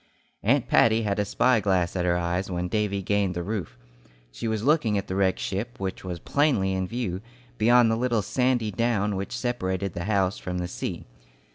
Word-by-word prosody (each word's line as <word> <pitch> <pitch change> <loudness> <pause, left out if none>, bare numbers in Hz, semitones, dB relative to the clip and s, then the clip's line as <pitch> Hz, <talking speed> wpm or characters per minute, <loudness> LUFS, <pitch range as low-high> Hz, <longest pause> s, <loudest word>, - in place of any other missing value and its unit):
Aunt - - +2
Patty 115 0 +4
had 100 -1 -1
a 105 - +1
spy 125 +4 +3
glass 95 -4 +1
at 90 -1 0
her 90 0 +2
eyes 90 +2 -1
when 90 -1 -2
Davy 100 -1 -1
gained 100 -1 0
the 85 - -2
roof. 90 - -4 0.5
She - - -5
was 110 -1 -1
looking 130 -7 +3
at 100 - -2
the 95 - -4
wrecked 95 -1 +2
ship, 105 +5 -4
which 95 -1 -4
was 90 -2 -4
plainly 105 - +1
in 95 -1 -1
view, 100 -5 -3 0.4
beyond 120 +1 +5
the - - +2
little 120 -2 0
sandy 125 -1 +1
down 105 -1 0
which 95 +1 -4
separated 100 -6 -2
the 85 0 -4
house 100 -2 +1
from 90 0 -4
the 90 0 -2
sea. 90 - -5
100 Hz, 200 wpm, -26 LUFS, 95-115 Hz, 0.5 s, beyond